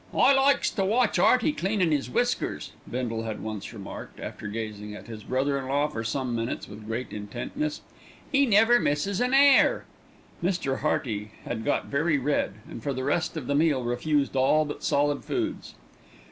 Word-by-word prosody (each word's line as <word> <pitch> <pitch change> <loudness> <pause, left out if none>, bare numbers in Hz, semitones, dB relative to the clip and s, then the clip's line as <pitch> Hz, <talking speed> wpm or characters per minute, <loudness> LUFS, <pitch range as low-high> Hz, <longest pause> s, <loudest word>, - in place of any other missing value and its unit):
"I 275 - +6
likes 275 +1 +3
to 195 - -1
watch 220 0 +2
'Earty 255 +10 +4
cleanin' 195 - 0
'is 140 -4 -1
whiskers," 245 - -1 0.2
Bindle 120 -2 -2
had 110 -2 -4
once 110 -2 -5
remarked, 100 -4 -9
after - - -6
gazing 105 -1 -5
at - - -10
his 110 -3 -9
brother 140 +2 0
in 130 - -6
law 145 +2 +1
for 115 -6 -4
some 125 +2 -2
minutes 115 +1 -3
with 105 0 -11
great 115 +2 -4
intentness. 120 - -4 0.5
"'E 275 0 +4
never 225 +3 +5
misses 185 +7 0
an 250 +2 +2
'air." 280 0 +5 0.6
Mr. 170 -7 0
Hearty 110 -8 -2
had 110 -2 -4
got 145 - 0
very 155 +2 +1
red, 140 -7 0
and - - -8
for 140 +4 -2
the 130 0 -3
rest 160 +4 0
of 145 - -4
the 140 - -1
meal 145 -3 +2
refused 140 +4 0
all 135 +4 +3
but 145 - -7
solid 145 0 +1
foods. - - -3
140 Hz, 175 wpm, -27 LUFS, 115-185 Hz, 0.6 s, I